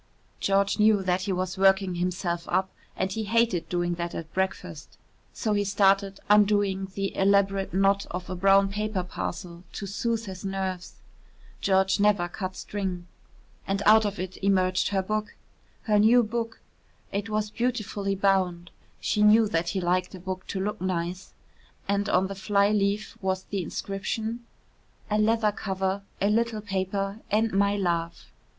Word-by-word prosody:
George 200 +1 +1
knew 210 -2 +4
that 180 0 +1
he 195 +1 -2
was 185 0 -2
working 190 -1 +4
himself 175 -1 -2
up 190 +1 +1 0.3
and 190 0 -1
he 220 +1 -3
hated 225 -5 +1
doing 175 0 0
that 170 0 -4
at 160 -1 -7
breakfast. 180 -4 -3 0.3
So 215 -3 -1
he 205 0 +1
started 195 0 +2
undoing 205 -2 +3
the 195 0 -2
elaborate 195 0 +2
knot 195 +2 +2
of 180 +1 -5
a 185 - -4
brown 195 +2 +4
paper 210 -1 -2
parcel 175 -1 -6
to 200 - -5
soothe 230 +3 -2
his 190 -2 -8
nerves 190 -2 -4 0.7
George 190 0 +2
never 200 -4 +3
cut 185 +1 -5
string. 190 -4 -4 0.6
And 195 +1 -1
out 220 +1 +7
of 205 -1 -2
it 185 +1 -5
emerged 185 -2 +2
her 195 -2 0
book 215 +2 -3 0.5
her 210 -2 +3
new 235 +3 +6
book. 225 0 -4 0.5
It 200 +2 -3
was 215 -1 -1
beautifully 215 -5 -2
bound 185 -3 +1 0.3
(she 210 - 0
knew 215 +1 +6
that 165 -1 0
he 190 - -2
liked 180 +2 0
a - - -9
book 185 +1 -6
to 195 - -3
look 210 +2 -3
nice) 180 0 -3 0.5
and 200 +1 0
on 185 -1 +3
the 195 - -4
fly 200 +1 +2
leaf 205 0 -1
was 190 -1 -1
the 195 -1 -3
inscription: 220 +6 -4 0.6
"A 210 - +2
leather 220 0 +3
cover, 190 -1 -2 0.2
a 200 +1 +2
little 230 0 0
paper 195 +1 -2
and 220 +1 +1
my 200 +1 +2
love." 170 -3 -2
195 Hz, 160 wpm, -26 LUFS, 185-210 Hz, 0.7 s, out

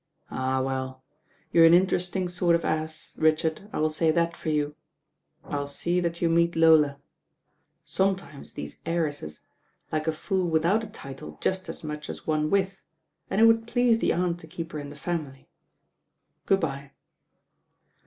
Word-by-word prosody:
"Ah, 130 0 0
well! 130 0 -3 0.5
you're 165 - +7
an 165 +1 +8
interesting 180 0 +1
sort 175 -1 +2
of 170 - -1
ass, 155 0 -3
Richard, 160 +4 +1
I - - -4
will 155 0 +1
say 160 +1 +1
that 170 +1 +2
for 160 - -4
you. 150 -1 0 0.7
I'll 140 -1 -3
see 170 +5 -1
that 170 0 -2
you - - +4
meet 170 +1 +3
Lola. 160 -3 +5 0.9
Sometimes 190 -7 -2
these 75 0 -7
heiresses 145 - -2 0.5
like 155 0 -1
a - - +4
fool 180 +3 -1
without 170 +7 +2
a - - -5
title 135 - -9
just 185 0 -1
as - - -6
much 150 -1 -5
as - - -7
one 155 -1 +1
with, 195 0 +1 0.5
and 195 - 0
it - - +6
would 225 0 +5
please 240 -1 +3
the - - +2
Aunt 175 -1 0
to 160 - -11
keep 165 0 -6
her 150 - -4
in 145 -1 -7
the 145 - -10
family 150 -4 -4 1.0
Good 195 0 +3
bye." 140 -3 -4
165 Hz, 165 wpm, -27 LUFS, 150-180 Hz, 1.0 s, an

